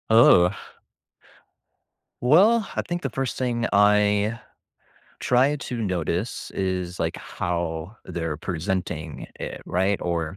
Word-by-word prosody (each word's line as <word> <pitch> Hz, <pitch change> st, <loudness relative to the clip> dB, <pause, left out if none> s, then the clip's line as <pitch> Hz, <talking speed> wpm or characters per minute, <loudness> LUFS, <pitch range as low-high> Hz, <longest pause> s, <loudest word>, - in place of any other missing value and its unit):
Oh. 100 Hz, -6 st, +7 dB, 1.7 s
Well, 200 Hz, -, +5 dB
I -, -, -1 dB
think 175 Hz, 0 st, -3 dB
the 135 Hz, -, -2 dB
1st 135 Hz, +2 st, -3 dB
thing 120 Hz, -2 st, -1 dB
I 105 Hz, +2 st, +3 dB, 0.8 s
try 130 Hz, +4 st, +3 dB
to 135 Hz, -3 st, -5 dB
notice 90 Hz, +1 st, -2 dB
is, 90 Hz, -2 st, -3 dB
like, -, -, -1 dB
how 85 Hz, +3 st, -4 dB
they're 80 Hz, -3 st, -3 dB
presenting 85 Hz, -2 st, -4 dB
it, -, -, -6 dB
right? 95 Hz, +3 st, +1 dB
Or 85 Hz, 0 st, -2 dB
100 Hz, 110 wpm, -24 LUFS, 85-120 Hz, 1.7 s, Oh